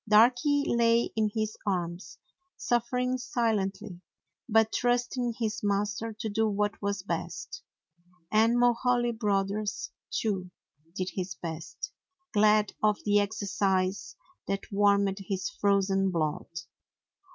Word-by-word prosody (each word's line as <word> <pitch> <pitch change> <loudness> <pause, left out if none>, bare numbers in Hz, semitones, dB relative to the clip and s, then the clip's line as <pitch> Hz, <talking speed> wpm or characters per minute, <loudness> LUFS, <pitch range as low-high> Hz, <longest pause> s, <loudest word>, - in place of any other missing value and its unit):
Darky 245 +7 +5
lay 235 0 +3
in 215 -1 +2
his 215 0 -2
arms, 180 -2 -3 0.4
suffering 250 +2 0
si 245 - -5
lently, 200 -4 -1 0.5
but 220 0 +4
trusting 245 0 0
his 220 -2 -1
master 205 +2 -1
to 220 +1 -5
do 220 +1 +1
what 205 +1 -1
was 200 -2 -2
best. 485 - -4 0.7
And 225 +2 +4
Mulhaly 240 0 +3
Brothers 205 -2 -1 0.2
too 190 -5 -2 0.5
did 185 -1 -2
his 185 -1 -4
best, 165 -1 -6 0.4
glad 210 0 +4
of 210 -1 +3
the 205 0 +4
exercise 200 -2 -1 0.3
that 195 0 -3
warmed 200 -1 +3
his 195 -1 -3
frozen 195 -1 +2
blood. 155 -4 -1
210 Hz, 115 wpm, -29 LUFS, 195-230 Hz, 0.7 s, Darky